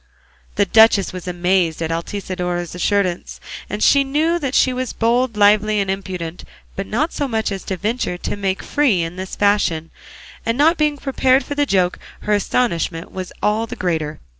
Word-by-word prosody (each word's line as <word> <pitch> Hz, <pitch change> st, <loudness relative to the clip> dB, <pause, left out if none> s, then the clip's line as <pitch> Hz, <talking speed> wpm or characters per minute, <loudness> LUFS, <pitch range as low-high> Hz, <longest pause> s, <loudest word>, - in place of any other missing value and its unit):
'" 60 Hz, -1 st, -33 dB
The -, -, +3 dB
duchess 220 Hz, -4 st, +5 dB
was 185 Hz, 0 st, -7 dB
amazed 180 Hz, -2 st, +1 dB
at 165 Hz, -1 st, -2 dB
Altisidora's 180 Hz, 0 st, -3 dB
assurance; 180 Hz, -1 st, -1 dB, 0.4 s
she 280 Hz, +6 st, +4 dB
knew 310 Hz, +5 st, +1 dB
that 275 Hz, -4 st, -3 dB
she 255 Hz, -, +4 dB
was 255 Hz, -1 st, -3 dB
bold, 235 Hz, 0 st, +1 dB
lively, 210 Hz, +1 st, +4 dB
and 195 Hz, -1 st, 0 dB
impudent, 180 Hz, -3 st, -5 dB, 0.3 s
but 195 Hz, 0 st, -4 dB
not 295 Hz, +10 st, -1 dB
so 285 Hz, -, -1 dB
much 220 Hz, -3 st, -1 dB
so -, -, -3 dB
as 190 Hz, -, -8 dB
to 190 Hz, -, -3 dB
venture 210 Hz, -2 st, -2 dB
to -, -, -4 dB
make 195 Hz, -2 st, -2 dB
free 255 Hz, -, +2 dB
in 165 Hz, +1 st, -5 dB
this 185 Hz, 0 st, -6 dB
fashion; 200 Hz, -6 st, +1 dB, 0.5 s
and 230 Hz, +1 st, -1 dB
not 320 Hz, +4 st, +4 dB
being 300 Hz, -1 st, +2 dB
prepared 265 Hz, -1 st, +2 dB
for -, -, -4 dB
the 290 Hz, 0 st, 0 dB
joke, 185 Hz, -4 st, +1 dB, 0.2 s
her 210 Hz, -, 0 dB
astonishment 180 Hz, -6 st, -1 dB
was 185 Hz, -1 st, -6 dB
all 215 Hz, +2 st, +1 dB
the -, -, -6 dB
greater. 160 Hz, -4 st, -2 dB
200 Hz, 185 wpm, -19 LUFS, 180-250 Hz, 0.5 s, duchess